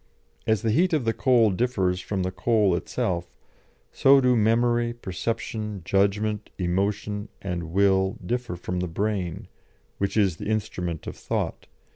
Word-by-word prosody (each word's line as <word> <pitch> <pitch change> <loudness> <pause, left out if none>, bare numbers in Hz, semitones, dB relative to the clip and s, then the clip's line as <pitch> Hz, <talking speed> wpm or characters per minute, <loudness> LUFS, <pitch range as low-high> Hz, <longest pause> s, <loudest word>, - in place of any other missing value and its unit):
As 110 0 +2
the 115 - +2
heat 175 +9 +3
of 150 -6 +1
the 115 - +2
coal 120 -5 +4
differs 95 -4 0
from 95 0 -2
the 90 - -1
coal 100 0 +2
itself, 85 0 -2 0.6
so 135 +1 +6
do 125 -1 +3
memory, 120 +2 +2
perception, 105 -1 -4
judgment, 105 +2 +1
emotion, 100 +3 -1
and 90 -3 -4
will 95 0 +3
differ 120 -1 -2
from 90 +1 -4
the 90 - -1
brain 95 0 -2 0.5
which 100 +2 -1
is 95 -6 +3
the - - -6
instrument 90 -6 -2
of - - -6
thought. - - -3
105 Hz, 145 wpm, -25 LUFS, 90-115 Hz, 0.6 s, so